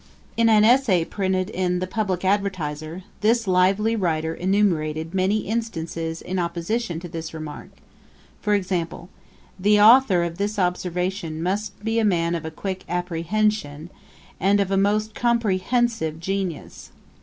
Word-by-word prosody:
In 230 0 +3
an 215 -1 +5
Essay 225 -8 +4
printed 190 0 -1
in 180 -2 0
The 185 - -2
Publick 190 -2 -2
Advertiser, 180 -4 -2 0.2
this 230 +2 +2
lively 195 +4 +2
writer 160 -5 -1
enumerated 165 -4 0
many 195 +3 +1
instances 165 -7 -4
in 185 +1 -3
opposition 170 +2 -2
to 175 - -7
this 165 -1 -7
remark; 155 -2 -7 0.7
for 210 -1 +2
example, 180 -3 -3 0.5
'The 210 +2 +4
authour 215 -4 +6
of 170 +1 -4
this 205 +1 -1
observation 180 -2 -2
must 200 +2 -3
be 225 +1 0
a - - +1
man 170 -5 +1
of 165 -2 -3
a - - -3
quick 190 +4 -5
apprehension, 175 -2 -1 0.5
and 200 +2 +3
of 195 -1 0
a - - +2
most 210 +2 +1
compre 230 -6 +1
hensive 225 -8 0
genius.' 190 -2 -4
185 Hz, 145 wpm, -23 LUFS, 170-210 Hz, 0.7 s, authour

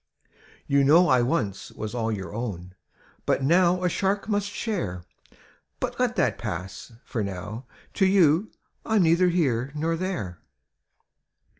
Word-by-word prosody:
"You 140 0 +3
know 165 +6 +6
I 130 -1 +5
once 120 - -1
was 110 0 -6
all 115 -2 -1
your 100 -2 -5
own. 95 -6 -5 0.5
But - - +1
now 180 +4 +3
a - - +3
shark 195 +4 -1
must 205 -2 0
share! 175 - -3 0.8
But - - -4
let - - +1
that - - +1
pass 95 +7 -6
— - - -38
^for 115 -5 -2
now 100 +5 -6 0.3
to 190 - +3
you 190 0 +4 0.3
I'm 220 -4 +2
neither 170 +2 +4
here 135 -7 0
nor 165 +2 0
there. 115 - -4
140 Hz, 145 wpm, -25 LUFS, -, 0.8 s, know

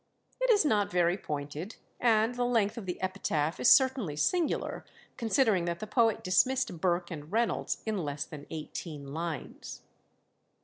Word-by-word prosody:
It - - +2
is 415 -8 +5
not 210 -7 +2
very 175 0 +2
pointed, 150 +3 -5 0.2
and 225 -1 +3
the 245 0 -1
length 225 -4 +1
of 220 -5 -7
the 180 - -4
epitaph 165 -5 -1
is - - +5
certainly 260 - +4
singular, 330 - 0 0.3
considering 225 -6 +2
that 170 0 -2
the - - -4
poet 225 0 +2
dismissed 250 -1 +1
Burke 175 -1 0
and 155 0 -8
Reynolds 230 +2 0
in 215 -3 -1
less 145 -3 -3
than 145 -2 -10
eighteen 150 -2 -7
lines. 160 -3 -6
185 Hz, 150 wpm, -30 LUFS, 160-235 Hz, 0.3 s, is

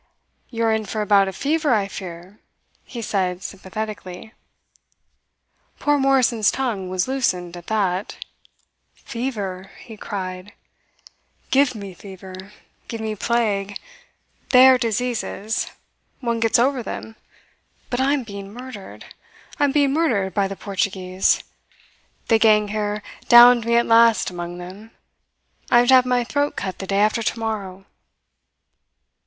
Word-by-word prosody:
"You 230 -1 -3
are 225 -1 +3
in 220 -1 -2
for 215 +1 -2
a - - -5
bout 200 -1 +4
of 190 - -5
fever, 295 - +1
I 200 -2 0
fear," 185 +1 -9 0.4
he 235 -3 -8
said 185 -3 -1
sympathetically. 200 0 -7 1.4
Poor 290 0 +1
Morrison's 255 -5 +3
tongue 220 -9 -2
was 185 +2 -1
loosened 180 -10 -1
at 175 -1 -11
that. 200 -3 -1 0.8
"Fever!" 205 -7 -5
he 225 -3 -11
cried. 185 -1 -6 1.0
"Give 270 -2 +3
me 200 -3 -8
fever. 190 +1 -11 0.4
Give 230 - -6
me 220 -1 -3
plague. 205 -3 -1 0.7
They 255 0 +8
are 255 -1 +5
diseases. 230 -1 -2 0.5
One 235 -3 -1
gets 225 -1 +3
over 260 +2 +2
them. 225 -1 -7 0.8
But 245 - -1
I 275 +2 +2
am 285 -3 -1
being 200 -2 -9
murdered. 245 -3 -10 0.5
I 290 - +4
am 280 - +1
being 280 -1 +2
murdered 225 - +1
by 200 0 +1
the 195 - -6
Portuguese. 190 -2 0 0.8
The 225 -1 +4
gang 210 -2 +4
here 210 0 -2 0.3
downed 240 -1 +8
me 235 0 +2
at 235 - +4
last 230 -3 +4
among 175 0 -6
them. 185 +5 -10 0.8
I 240 - +6
am 245 - 0
to - - +7
have 255 -1 +6
my 250 -1 +2
throat 285 +4 -1
cut 190 -1 -5
the 195 - -6
day 195 - 0
after 215 +2 +2
tomorrow." 215 -5 -4
215 Hz, 140 wpm, -22 LUFS, 195-240 Hz, 1.4 s, They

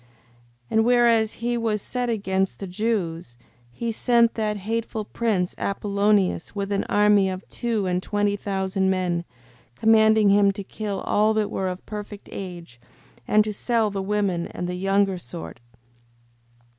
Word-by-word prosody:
5:24. 120 - -30 0.6
And 220 0 +4
whereas 235 -2 +4
he 240 +1 -2
was 220 -2 0
set 245 +4 -3
against 195 -4 -1
the 195 - -6
Jews, 180 - -2 0.3
he 230 - -4
sent 235 +1 +3
that 215 -2 -1
hateful 220 +1 -3
prince, 205 -6 -1
Apollonius, 200 -2 0
with 200 0 -3
an 200 - 0
army 205 -2 +4
of 185 0 -6
two 230 -4 -2
and 180 0 0
twenty 205 +1 0
thousand 190 -1 -1
men, 180 -2 0 0.5
commanding 220 - +5
him 200 0 +5
to 200 - -6
kill 205 0 -4
all 215 +1 +2
that 215 -1 0
were 190 - -2
of 185 0 -5
perfect 210 -1 -8
age, 170 -10 -8 0.5
and 215 0 +5
to 210 0 -4
sell 225 0 0
the 195 -1 -3
women 190 -3 -1
and 175 - -5
the 180 - -3
younger 195 0 +1
sort. 85 - -8
205 Hz, 155 wpm, -24 LUFS, 190-220 Hz, 0.6 s, commanding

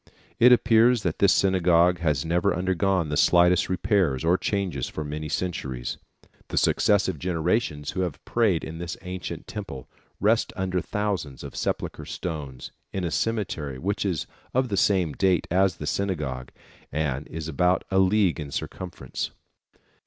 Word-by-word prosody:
It 125 +2 +8
appears 120 -1 +5
that 85 -3 -2
this 100 - +5
synagogue 90 -2 +3
has 75 -3 0
never 90 +3 +1
undergone 95 -1 +1
the 75 - -1
slightest 90 +3 +4
repairs 90 -6 +1
or 85 +2 +4
changes 95 - -1
for 75 - -5
many 75 +1 -5
centuries. 70 -7 -3 0.5
The - - -5
successive 100 -5 +2
generations 80 -3 -1
who 95 - -2
have 90 -5 -4
prayed 105 -8 +2
in 80 +1 -6
this 85 0 -5
ancient 90 0 -6
temple 70 -12 -7 0.3
rest 110 +4 +2
under 95 -1 -1
thousands 100 - -3
of - - -8
sepulchral - - -3
stones, 75 -7 -5 0.2
in 95 - -3
a 85 - -1
cemetery 90 - -2
which 100 +7 -2
is 90 -6 -1 0.3
of 130 -1 +2
the 100 - 0
same 95 -5 +2
date 95 -1 +2
as 95 0 +3
the 75 - -7
synagogue, 75 -8 -2 0.4
and 75 -2 -2
is 80 -1 -6
about 90 +4 +2
a 95 - +3
league 95 -2 +3
in 75 -2 -5
circumference. 90 +5 -5
90 Hz, 155 wpm, -25 LUFS, 75-95 Hz, 0.5 s, It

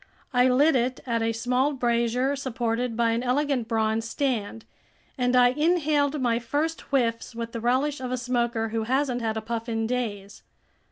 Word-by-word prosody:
I 250 +1 +4
lit 280 +4 +4
it 255 +1 0
at 230 -2 0
a 225 0 +1
small 250 +5 0
brazier 245 +1 +1
supported 240 -3 -2
by 230 -1 +2
an 230 +1 0
elegant 255 -1 0
bronze 225 0 0
stand, 230 -6 -2 0.5
and 250 -1 +1
I 245 0 +6
inhaled 300 0 +1
my 235 -2 +1
first 295 +7 -2
whiffs 235 -4 0
with 230 0 -5
the 230 - -5
relish 260 +4 +1
of 255 -1 -4
a 255 - 0
smoker 235 -2 -1
who 225 0 -2
hasn't 260 0 0
had 220 -1 -1
a - - -2
puff 230 +1 -4
in 225 -1 -1
days. 215 -5 -4
245 Hz, 175 wpm, -26 LUFS, 230-260 Hz, 0.5 s, I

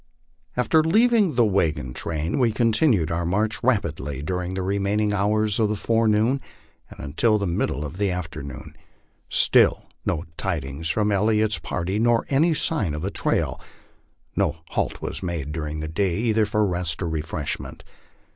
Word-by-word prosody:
After 155 +6 +3
leaving 215 - +3
the 120 -1 +4
wagon 80 -11 0
train, 80 - -2
we 120 -3 +3
continued 110 - +2
our 85 +1 -1
march 105 +6 0
rapidly 80 - -1
during 90 +3 -3
the 95 - -2
remaining 100 +2 0
hours 105 +1 +1
of 110 -2 +3
the 105 - 0
forenoon 115 +4 +2 0.5
and - - -13
until 105 +10 +1
the 100 - -2
middle 85 -4 -1
of 80 +5 -7
the 100 -1 +1
afternoon. 80 -7 -6 0.5
Still - - +4 0.2
no 80 - -1
tidings 80 -4 -3
from 105 +3 +1
El 100 +1 +2
liot's 110 -1 +2
party 95 +4 -2
nor 115 0 +3
any 155 +4 +3
sign 105 - 0
of 75 - -5
a 100 - -2
trail. - - -1 0.7
No 75 - +1
halt - - -2
was - - -4
made 85 -5 -3
during 75 -1 -4
the 80 - -4
day 90 +2 0
either 110 -1 +2
for 105 0 +1
rest 90 -2 -1
or - - -1
refreshment. 80 -2 -4
100 Hz, 160 wpm, -24 LUFS, 80-110 Hz, 0.7 s, the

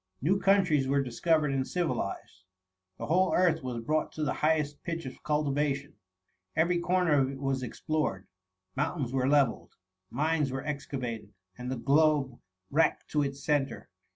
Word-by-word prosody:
New 185 +9 +2
countries 185 -9 +3
were 140 +1 +2
dis 125 -3 -8
coyered 155 -4 +3
and 130 -1 -1
civilized; 100 - -3 0.5
the - - -5
whole 185 +4 +2
earth 175 -3 +3
was 125 -3 -4
brought 155 +4 0
to 155 - -3
the 145 - 0
highest 150 -2 +1
pitch 165 -1 -4
of 130 - -8
cultivation; 145 -1 -1 0.6
every 170 +2 +2
comer 180 -1 +2
of 135 -3 +3
it 135 -1 -7
was 135 -1 -1
explored; 130 - -2 0.5
mountains 135 -7 -2
were 130 0 +1
levelled, 140 -5 +1 0.3
mines 150 +1 0
were 135 +1 -4
excavated, 125 -8 -5 0.2
and 125 0 -6
the 130 - -2
globe 140 -1 +2 0.3
racked 160 +3 +1
to 150 - +2
its 140 0 -3
centre. 140 -5 -1
145 Hz, 155 wpm, -29 LUFS, 130-160 Hz, 0.6 s, countries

